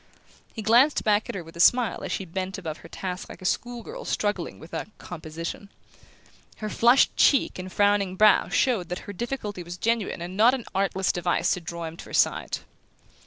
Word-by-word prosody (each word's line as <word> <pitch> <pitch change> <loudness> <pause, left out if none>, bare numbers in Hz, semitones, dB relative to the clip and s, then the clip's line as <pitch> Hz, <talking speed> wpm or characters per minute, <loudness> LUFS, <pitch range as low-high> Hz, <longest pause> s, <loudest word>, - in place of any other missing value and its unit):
He 220 - -7
glanced 245 +7 +4
back 210 0 +2
at - - -4
her 180 - -4
with 165 +1 -14
a - - -10
smile 245 +5 +4
as - - -4
she 195 - -2
bent 185 +3 -4
above 165 -5 -5
her 165 - -14
task 180 0 -5
like - - -10
a 185 - -10
school 240 +4 -2
girl - - -8
struggling 205 -5 -2
with 160 - -14
a - - -3
"composition." 165 +3 -7 0.9
Her 215 - -4
flushed 240 +3 +4
cheek 275 -8 +3
and 185 0 -6
frowning 205 -2 +2
brow 210 +1 +5
showed 220 -10 +1
that 180 - -5
her 205 - -7
difficulty 210 -3 -4
was 175 +1 -7
genuine 230 -2 0
and 175 +2 -6
not 230 +6 +5
an 245 - -7
artless 195 0 +1
device 175 0 0
to 180 - -1
draw 170 0 -6
him 160 +1 -7
to - - -10
her - - -12
side. - - +2
195 Hz, 205 wpm, -26 LUFS, 175-220 Hz, 0.9 s, brow